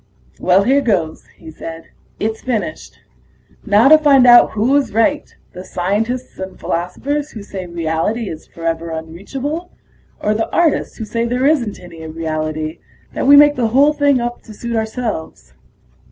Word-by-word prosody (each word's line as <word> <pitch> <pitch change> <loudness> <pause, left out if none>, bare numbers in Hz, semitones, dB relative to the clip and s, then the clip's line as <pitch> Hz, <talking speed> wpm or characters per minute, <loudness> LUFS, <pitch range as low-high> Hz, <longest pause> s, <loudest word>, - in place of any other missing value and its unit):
"Well, 185 +2 +3
here 270 +5 +3
goes," 180 - -1
he 160 - -11
said. 165 +1 -9 0.3
"It's 220 +1 -2
finished. 255 +5 -4 0.7
Now 210 +4 +5
to 310 +2 +8
find 280 -4 +5
out 240 -1 +7
who 230 +6 +2
is 285 -6 +1
right, 290 +6 +1 0.2
the 180 - -8
scientists 215 +8 -3
and 190 0 -7
philosophers 280 - -3
who 215 -7 -9
say 190 -2 -7
reality 170 +7 -2
is 160 -3 -8
forever 165 0 -4
unreachable, 250 - -5 0.5
or 210 - 0
the 220 +1 -2
artists 335 -3 +1
who 220 - -5
say 230 +2 -2
there 250 +2 0
isn't 265 -8 +1
any 170 -2 -12
reality 155 -1 -4 0.3
that - - -2
we 285 - +8
make 290 0 +7
the 240 -3 +1
whole 275 +6 +4
thing 285 -3 +2
up 240 0 -4
to 215 - -12
suit 235 +2 -4
ourselves." 220 - -4
220 Hz, 160 wpm, -17 LUFS, 170-265 Hz, 0.7 s, to